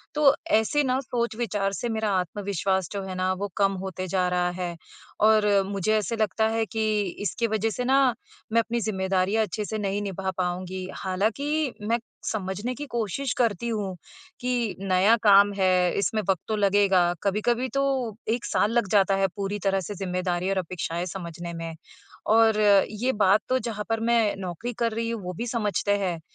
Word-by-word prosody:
तो 290 -2 +6 0.2
ऐसे 290 +7 +1
ना 260 -1 +1
सोच-विचार 230 -5 -2
से 240 +4 -3
मेरा 220 -1 -1
आत्मविश्वास 190 -1 -1
जो 200 - -3
है 190 -1 -6
ना, 185 0 0
वो 200 +2 -3
कम 195 -1 +3
होते 185 -1 -5
जा 180 0 +1
रहा 180 0 +1
है, 175 -1 -4 0.4
और 215 0 +5 0.2
मुझे 200 +2 0
ऐसे 215 +2 -1
लगता 220 0 +1
है 225 0 0
कि 220 +3 -2 0.4
इसकी 230 +6 0
वज़ह 220 0 0
से 235 +3 -3
ना 265 +2 +4 0.6
मैं 230 - +5
अपनी 230 +1 -2
ज़िम्मेदारियाँ 190 +1 +1
अच्छे-से 215 +2 -4
नहीं 200 0 -1
निभा 190 -1 -3
पाऊँगी। 185 +1 -3
हालाँकि 255 +10 -1
मैं 235 +1 +2 0.3
समझने 205 +4 -3
की 290 - -6
कोशिश 240 +4 -1
करती 235 -2 +1
हूँ, 205 -4 -2 0.4
कि 245 -3 -1
नया 195 +3 +4
काम 200 -1 +6
है 185 -1 +3
इसमें 215 +2 0
वक़्त 185 -4 +2
तो 220 - 0
लगेगा। 195 -3 +3
कभी-कभी 230 +5 +1
तो 275 - +3 0.5
1 235 +2 0
साल 210 - +1
लग 235 -4 +1
जाता 195 -1 +4
है 195 0 +2
पूरी 200 0 -3
तरह 195 -1 +2
से 205 - -4
ज़िम्मेदारी 180 -1 -2
और 195 - 0
अपेक्षाएँ 175 -1 -3
समझने 170 -2 -6
में, 165 -1 -6 0.5
और 220 0 +4 0.3
ये 235 +5 0
बात 205 +1 +4
तो 255 - +3
जहाँ 215 -4 -4
पर 225 0 +1
मैं 230 -3 +3
नौकरी 190 +6 -5
कर 230 -1 +1
रही 230 +1 -2
हूँ 230 -3 -3
वो 180 0 -4
भी 230 +7 -4
समझते 210 -3 0
हैं, 180 -4 -2
205 Hz, 180 wpm, -26 LUFS, 185-225 Hz, 0.6 s, तो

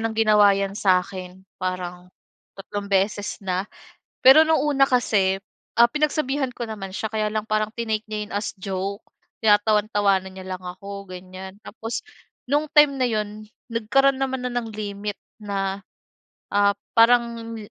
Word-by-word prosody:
ng 225 0 -1
ginawa 210 -2 +5
yan 195 0 -2
sa'kin. 185 -1 0 0.2
Parang, 180 -1 -4 0.5
tatlong 200 +1 -6
beses 200 +1 0
na. 185 -1 -2 0.6
Pero 275 +5 +8
no'ng 320 0 +3
una 280 -2 +4
kasi, 195 -6 +2 0.3
ah, 235 0 +6
pinagsabihan 290 -2 0
ko - - -4
naman 195 -3 -6
siya, 220 - -3
kaya 215 -1 0
lang 215 -1 -1
parang 215 0 0
tinake 220 -2 -2
niya 215 0 -4
'yon - - -9
as 205 +1 -1
joke. 195 +2 -4 0.4
Tinatawan-tawanan 205 -2 +3
niya 185 - -8
lang 185 - -14
ako, 195 +2 -8
ganyan. 185 +1 -9
Tapos 225 +1 -5 0.4
no'ng 295 +3 +1
time 295 -2 +6
na 255 -2 +1
'yon, 215 -1 -3 0.3
nagkaro'n 270 +5 +3
naman 265 -1 -2
na - - -5
ng 240 -2 -2
limit 205 -1 -5 0.2
na, 195 -1 -2 0.7
ah, 200 0 +4 0.2
parang 230 -1 +3
210 Hz, 145 wpm, -23 LUFS, 195-235 Hz, 0.7 s, Pero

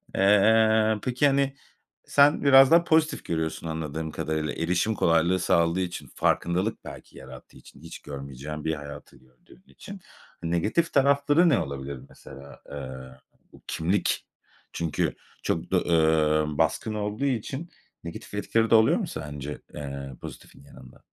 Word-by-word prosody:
Eee, 110 +2 +4
peki, 125 +3 +2
hani, 140 0 +1 0.5
sen 145 +1 +4
biraz 135 -1 +7
daha 170 +1 +6
pozitif 160 -1 +1
görüyorsun 80 0 -3
anladığım 80 0 -4
kadarıyla 75 0 -3
erişim 90 +6 0
kolaylığı 85 +1 +2
sağladığı 85 0 +2
için, 90 -1 -5
farkındalık 90 +6 0
belki - - -11
yarattığı 65 - -13
için - - -17
hiç - - -10
görmeyeceğin 70 +2 -8
bir 80 - 0
hayatı 75 -1 -10
gördüğün 65 - -23
için. 200 -1 -11 0.4
Negatif 85 - 0
tarafları 140 +4 +4
ne - - +3
olabilir 70 -1 -5
mesela? 70 +1 -13
Eee, 65 -2 -8 0.4
bu - - -17
kimlik 90 +5 -1 0.5
çünkü 85 -2 -2 0.3
çok - - -2
do - - +4
eee, 80 -2 +2
baskın 110 - 0
olduğu 105 +5 -3
için 135 +5 -3 0.3
negatif 85 +3 -9
etkileri 110 +2 0
de - - +6
oluyor 110 0 +5
mu - - -3
sence, 75 0 -7
eee, 70 -2 -7
pozitifin - - -11
yanında? 65 -2 -16
85 Hz, 135 wpm, -26 LUFS, 75-115 Hz, 0.5 s, biraz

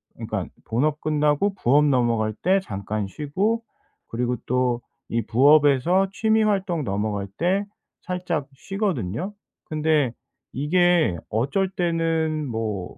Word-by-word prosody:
그러니깐 - - -4 0.2
본업 145 +6 0
끝나고 150 +6 +1
부업 145 -1 +3
넘어갈 115 -5 +2
때 190 +2 +2
잠깐 100 - -4
쉬고 190 - -1 0.5
그리고 125 +1 -1
또 125 -1 +1 0.3
이 115 0 0
부업에서 145 - +4
취미 220 0 +2
활동 195 -6 0
넘어갈 100 0 -2
때 190 +4 +1 0.4
살짝 180 -6 -3
쉬거든요. 185 - -3 0.3
근데 155 -5 +1 0.4
이게 160 - +2
어쩔 140 - 0
때는 165 -3 0
뭐 110 -6 -4
150 Hz, 235 characters per minute, -24 LUFS, 120-180 Hz, 0.5 s, 부업에서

